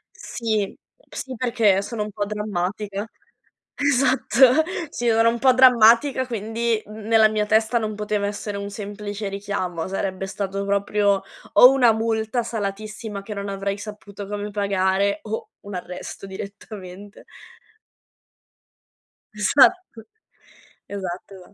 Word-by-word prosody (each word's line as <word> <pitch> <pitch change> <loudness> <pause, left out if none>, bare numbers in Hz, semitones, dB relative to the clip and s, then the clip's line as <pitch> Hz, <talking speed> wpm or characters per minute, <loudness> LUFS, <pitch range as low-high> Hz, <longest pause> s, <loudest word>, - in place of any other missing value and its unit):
Sì, 215 -4 -2 0.3
sì 260 -1 -6
perché 225 -5 +2
sono 215 0 -4
un 210 - -7
po' 205 +1 -2
drammatica. 205 0 -3 0.7
Esatto, 265 0 +4 0.3
sì, 240 - -3
sono 225 +1 +4
un 235 0 -2
po' 260 -1 +5
drammatica 255 +1 +5
quindi 225 0 -1
n - - -12
n 210 - -9
nella 220 -1 +5
mia 215 -1 0
testa 220 +2 +3
non 215 -1 -3
poteva 210 -1 -1
essere 205 0 -4
un 200 0 -5
semplice 205 0 -6
richiamo, 195 -4 -3 0.4
stato 195 0 -3
proprio 200 0 +1 0.3
o 250 - +9
una 250 -4 +5
multa 225 +1 -1
salatissima 210 -1 -5
che 210 - -6
non 200 0 -5
avrei 195 0 -3
saputo 205 -1 -9
come 205 0 -4
pagare 200 0 +1
o 220 +1 -5
un 200 0 -9
arresto 180 +2 -7
direttamente. 195 0 -9 2.1
Esatto. 255 - +3 0.8
Esatto, 195 -1 -6
esatto. 180 -1 -15
210 Hz, 125 wpm, -23 LUFS, 200-225 Hz, 2.1 s, o